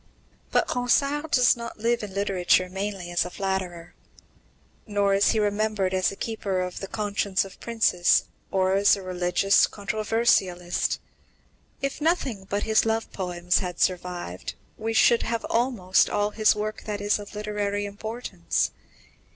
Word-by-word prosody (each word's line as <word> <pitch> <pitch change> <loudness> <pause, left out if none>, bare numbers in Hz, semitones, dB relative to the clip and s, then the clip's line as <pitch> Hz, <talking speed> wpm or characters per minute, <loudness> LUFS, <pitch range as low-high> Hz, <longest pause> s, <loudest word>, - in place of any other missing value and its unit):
But - - +2
Ronsard 280 +5 +1
does 250 -4 +5
not 235 -1 -7
live 235 +2 0
in 200 -3 -7
literature 185 -2 +2
mainly 190 -2 -4
as 175 - +2
a 180 - -6
flatterer. 180 -3 -4 0.9
Nor 205 -1 +1
is 195 +1 +4
he - - +2
remembered 205 -2 0
as 185 0 +2
a - - -8
keeper 200 -4 -3
of 180 0 -4
the 195 - -5
conscience 200 -2 -1
of 195 - -13
princes, 220 -7 +2 0.3
or 190 0 +1
as 200 +1 +5
a 195 - -8
religious 180 +2 +3
controversialist. 205 -4 0 0.8
If 275 +2 -2
nothing 270 - 0
but 205 +1 -1
his 220 -1 +3
love 225 0 -1
poems 180 -1 0
had 180 -3 -5
survived, 175 - -2 0.2
we 225 +1 -3
should 230 +1 +5
have 230 -1 -2
almost 230 -6 +2
all 205 0 0
his 215 0 +3
work 215 0 -4
that 210 -1 -3
is 205 +1 +1
of 205 +1 -10
literary 205 -1 -2
importance. 205 -3 -3
205 Hz, 150 wpm, -25 LUFS, 185-220 Hz, 0.9 s, does